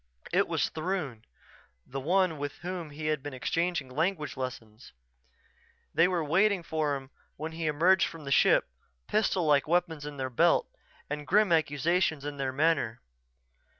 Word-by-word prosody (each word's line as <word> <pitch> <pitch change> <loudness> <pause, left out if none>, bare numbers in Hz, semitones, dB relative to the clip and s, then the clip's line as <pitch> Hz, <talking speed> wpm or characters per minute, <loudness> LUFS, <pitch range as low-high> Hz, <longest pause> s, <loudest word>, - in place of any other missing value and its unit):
It - - +3
was - - 0
Throon, 155 - -3 0.6
the 135 - -5
one 170 +2 +1
with 145 0 -3
whom 175 -3 -4
he 150 +1 -7
had 155 -2 0
been 145 -1 -6
exchanging 165 +2 -1
language 155 +4 -1
lessons. 120 -3 -7 1.0
They 165 - +5
were 180 -3 0
waiting 190 +5 +2
for 155 -3 -1
him 135 0 -8 0.2
when 155 +2 -5
he 165 0 -3
emerged 175 +5 +4
from 165 -2 -10
the 140 - -6
ship, - - +4 0.4
pistol 195 -5 +1
like 145 -2 +3
weapons 170 -2 0
in 145 -1 -7
their 130 -1 -3
belts 120 - +2 0.3
and 150 0 -5
grim 210 -1 +4
accusation 160 0 +1
in 145 -1 -5
their 135 -1 -1
manner. 130 -5 +1
155 Hz, 155 wpm, -29 LUFS, 140-175 Hz, 1.0 s, They